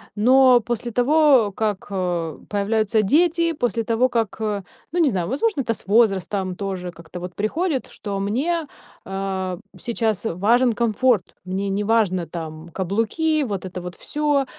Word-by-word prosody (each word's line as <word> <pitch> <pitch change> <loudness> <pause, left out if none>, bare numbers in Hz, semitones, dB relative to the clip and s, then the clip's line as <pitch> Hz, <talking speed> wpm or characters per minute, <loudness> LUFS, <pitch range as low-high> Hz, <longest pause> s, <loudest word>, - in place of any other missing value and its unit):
Но 255 +3 +6
после 240 +1 -3
того, 255 -4 +4
как, 210 -2 -2
э, 175 -4 -2
появляются 215 +1 +1
дети, 335 - +3
после 235 -5 -1
того, 245 +2 +2
как, 230 -4 -1 0.5
ну, 350 - -1
не 295 -7 +4
знаю, 180 -1 -2
возможно, 290 - 0
это 230 -2 -1
с 200 - -10
возрастом 195 -3 +2
тоже 190 -3 -4
как-то 170 +1 -10
вот 180 0 -7
приходит, 280 - -1
что 200 -2 -5
мне, 290 - -1 0.4
а, 190 -2 -3 0.2
сейчас 225 -3 -1
важен 225 +6 +3
комфорт. 230 -2 +1
Мне 195 +2 -2
неважно, 200 -4 +1
там, 160 -1 -7
каблуки, 230 - 0
вот 200 -5 -4
это 185 -1 -6
вот 180 0 -7
всё, 295 -2 0
215 Hz, 145 wpm, -22 LUFS, 190-255 Hz, 0.5 s, Но